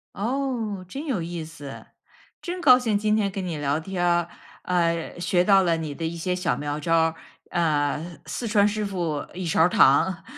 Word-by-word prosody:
哦， 225 -3 -2
真 275 - -6
有 250 - -1
意 170 0 -5
思。 150 -3 -10 0.6
真 360 0 -5
高 255 -6 +8
兴 225 -5 +1
今 215 +1 +1
天 205 -2 +1
跟 190 -1 -4
你 170 -3 -3
聊 145 +1 0
天 180 +2 -4
儿， 175 -1 +2 0.4
呃， 170 -1 -1
学 175 0 +2
到 195 0 +5
了 170 -2 +2
你 155 -3 -4
的 165 +3 -5
一 165 +1 -3
些 180 +2 -2
小 180 -2 0
妙 145 0 -3
招 165 +2 -1
儿， 165 0 +2 0.3
呃， 155 0 -1
四 195 +10 -4
川 205 -1 +4
师 210 0 -2
傅 170 -7 -3
一 185 0 -5
勺 160 - +2
儿 170 - +5
糖， 175 +4 +4
175 Hz, 210 characters per minute, -24 LUFS, 160-205 Hz, 0.6 s, 高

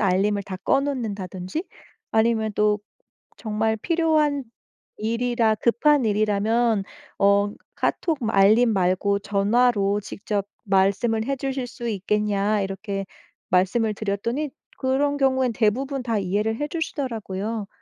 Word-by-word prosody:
알림을 200 +1 +2
다 190 -1 -6
꺼 275 - +3
놓는다든지 210 - -4 0.5
아니면 220 -1 +2
또 210 0 +2 0.6
정말 220 0 -1
필요한 310 -2 +1 0.5
일이라 230 0 +1
급한 250 +4 +3
일이라면 215 +1 +2 0.4
어 200 +1 +4 0.2
"카톡 325 -4 0
알림 215 +4 +5
말고 190 +2 +1
전화로 205 0 +2
직접 200 0 -3 0.2
말씀을 200 +4 +2
해주실 270 -1 -2
수 235 0 -7
있겠냐." 210 0 0
이렇게 195 0 -4 0.4
말씀을 210 +4 +2
드렸더니 225 +8 -2 0.3
그런 285 +2 +1
경우에는 260 -3 +2
대부분 255 +5 0
다 230 -3 0
이해를 205 +4 0
해 295 - -1
주시더라고요. 225 - -3
220 Hz, 270 characters per minute, -24 LUFS, 200-250 Hz, 0.6 s, 알림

